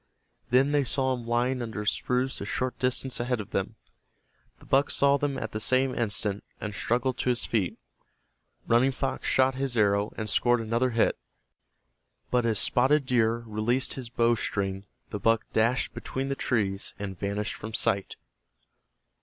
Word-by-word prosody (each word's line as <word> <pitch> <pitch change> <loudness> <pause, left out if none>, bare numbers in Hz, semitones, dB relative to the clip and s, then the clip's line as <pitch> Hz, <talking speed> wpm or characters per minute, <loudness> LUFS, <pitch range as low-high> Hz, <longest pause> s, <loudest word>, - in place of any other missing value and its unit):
Then 130 +3 +4
they 145 -1 +3
saw 130 0 +1
him 120 -2 -6
lying 125 +2 +1
under 110 -3 -4
a - - -6
spruce 125 +4 0
a - - -3
short 130 0 -2
distance 130 0 0
ahead 120 0 -1
of 105 - -7
them. - - -2 0.8
The - - -18
buck 135 +1 +3
saw 140 0 +3
them 140 -1 -1
at 110 - -4
the 110 - -3
same 130 +3 +2
instant, 105 -3 -1 0.2
and 105 -1 -5
struggled 120 +4 -1
to - - 0
his 125 -1 +2
feet. 105 -6 -1 0.9
Running 120 +4 +4
Fox 130 0 -3
shot 130 0 +3
his 130 -2 -3
arrow 100 0 +2
and 110 - -3
scored 120 +3 +3
another 115 +3 0
hit, 115 -2 +1 1.1
but 125 -1 +2
as 110 -2 +1
Spotted 135 +6 +3
Deer 115 -2 +1
released 115 +4 0
his 125 -3 -7
bow 115 0 +2
string 100 -3 -2 0.3
the 105 - -3
buck 115 +2 +2
dashed 115 +3 +1
between 135 +1 -4
the 135 - -1
trees 100 -7 -1
and 100 -3 -6
vanished 100 +1 -2
from 110 +1 -7
sight. 100 -2 0
120 Hz, 170 wpm, -27 LUFS, 110-130 Hz, 1.1 s, Then